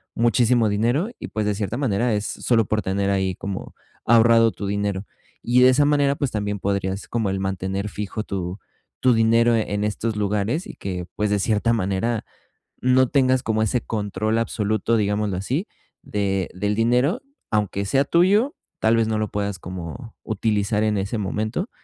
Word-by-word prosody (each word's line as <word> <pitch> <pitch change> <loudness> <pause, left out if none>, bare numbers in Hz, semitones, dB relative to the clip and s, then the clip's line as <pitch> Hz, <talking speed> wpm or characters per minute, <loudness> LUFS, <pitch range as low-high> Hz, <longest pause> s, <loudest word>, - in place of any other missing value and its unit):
muchísimo 120 -1 +3
dinero 120 - +1
y, - - -6
pues, 110 -1 -2
de 105 -1 0
cierta 105 +3 -3
manera 120 -3 +1
es 105 0 -1
solo 115 -3 +1
por 110 +1 0
tener 100 +1 0
ahí 95 -2 0
como 100 -1 -6 0.3
ahorrado 115 0 +5
tu 100 - -6
dinero. 100 -1 -2 0.4
Y 125 +1 +3
de 125 - +8
esa 145 +3 +4
manera, 145 -1 +3
pues, 140 -3 -2
también 105 -1 -2
podrías 100 0 -2
como 115 -4 -1
el 95 - -2
mantener 95 +1 -2
fijo 105 +1 -4
tu 95 -1 -4 0.4
tu 130 -1 +5
dinero 115 +1 +4
en 105 -2 -1
estos 105 +2 -2
lugares 105 - -1
y - - -9
que, 90 -2 -5
pues, 105 0 0
de 105 - +2
cierta 110 +3 +1
manera 110 +2 -1 0.6
no 130 0 +4
tengas 130 -2 +2
como 110 0 0
ese 115 +3 0
control 110 +1 -2
absoluto, 110 0 0
digámoslo 105 -2 0
así, 135 - -2 0.4
de 95 -3 -1
del 105 +3 -1
dinero, 125 - +2 0.3
aunque 100 -2 0
sea 135 +7 +2
tuyo, 205 - +3 0.2
tal 110 +1 +3
vez 115 - +2
no 110 -1 0
lo 110 - 0
puedas 100 -2 -3
como 90 - -8
utilizar 105 0 0
en 105 -1 +1
ese 100 +4 -2
momento. 110 - -2
110 Hz, 175 wpm, -23 LUFS, 100-120 Hz, 0.6 s, de